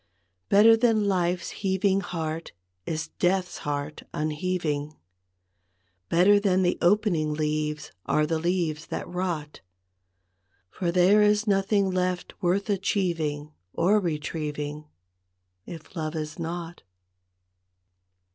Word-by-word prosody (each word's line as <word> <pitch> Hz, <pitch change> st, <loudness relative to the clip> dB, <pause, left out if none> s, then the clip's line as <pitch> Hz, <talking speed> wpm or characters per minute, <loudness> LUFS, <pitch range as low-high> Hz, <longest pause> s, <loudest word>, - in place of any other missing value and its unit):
III. 90 Hz, +1 st, -46 dB
Better 220 Hz, +3 st, +7 dB
than 225 Hz, -3 st, +2 dB
life's 180 Hz, -2 st, 0 dB
heaving 195 Hz, 0 st, +1 dB
heart 165 Hz, -3 st, -4 dB, 0.3 s
is 160 Hz, 0 st, -3 dB
death's 180 Hz, 0 st, +1 dB
heart 145 Hz, +1 st, -4 dB
un¬ 155 Hz, +1 st, -1 dB
heaving, 155 Hz, -3 st, -2 dB, 1.1 s
Better 195 Hz, +4 st, +5 dB
than 190 Hz, -2 st, +2 dB
the 175 Hz, -, +1 dB
opening 175 Hz, -5 st, +2 dB
leaves 150 Hz, 0 st, -2 dB, 0.2 s
are 150 Hz, -, +2 dB
the 160 Hz, +1 st, -1 dB
leaves 165 Hz, -2 st, -1 dB
that -, -, -4 dB
rot, 175 Hz, -5 st, -4 dB, 1.1 s
For 175 Hz, -2 st, -2 dB
there 185 Hz, +4 st, +5 dB
is 210 Hz, +1 st, +3 dB
nothing 195 Hz, -1 st, +2 dB
left 180 Hz, -1 st, -1 dB
worth 190 Hz, +3 st, +1 dB
achieving 165 Hz, -7 st, -1 dB, 0.2 s
or 200 Hz, +5 st, +3 dB
retrieving, 150 Hz, -3 st, -4 dB, 0.8 s
If 165 Hz, +1 st, -10 dB
love 155 Hz, -1 st, -3 dB
is 155 Hz, +1 st, -5 dB
not. 170 Hz, +1 st, -5 dB
175 Hz, 110 wpm, -26 LUFS, 155-190 Hz, 1.1 s, Better